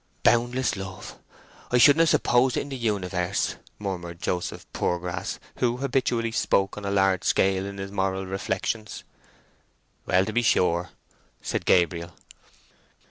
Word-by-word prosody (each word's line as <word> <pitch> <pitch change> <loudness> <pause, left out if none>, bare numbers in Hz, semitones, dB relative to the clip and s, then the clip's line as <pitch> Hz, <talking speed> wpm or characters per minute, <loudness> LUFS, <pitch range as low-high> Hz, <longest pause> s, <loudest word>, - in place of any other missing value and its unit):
"Boundless 120 +1 +2
love; 95 -1 -7 0.6
I 125 - +3
shouldn't 145 +5 +7
have 165 -1 +5
supposed 125 -1 +3
it - - +1
in - - -7
the 135 - -4
universe!" 95 -5 -1 0.2
murmured 85 -4 -5
Joseph 90 0 -3
Poorgrass, 90 0 -2 0.2
who 120 -1 +1
habitually 125 -3 0
spoke 95 -3 +1
on 105 - -7
a - - -1
large 95 -2 +2
scale 95 0 +2
in 100 0 -7
his 95 0 -6
moral 95 -1 -1
reflections. 95 +3 -3 1.0
"Well, 95 +1 +3
to 110 - -4
be 120 - +2
sure," 90 -6 +2 0.5
said - - -2
Gabriel. 85 -1 +2
95 Hz, 135 wpm, -25 LUFS, 90-120 Hz, 1.0 s, shouldn't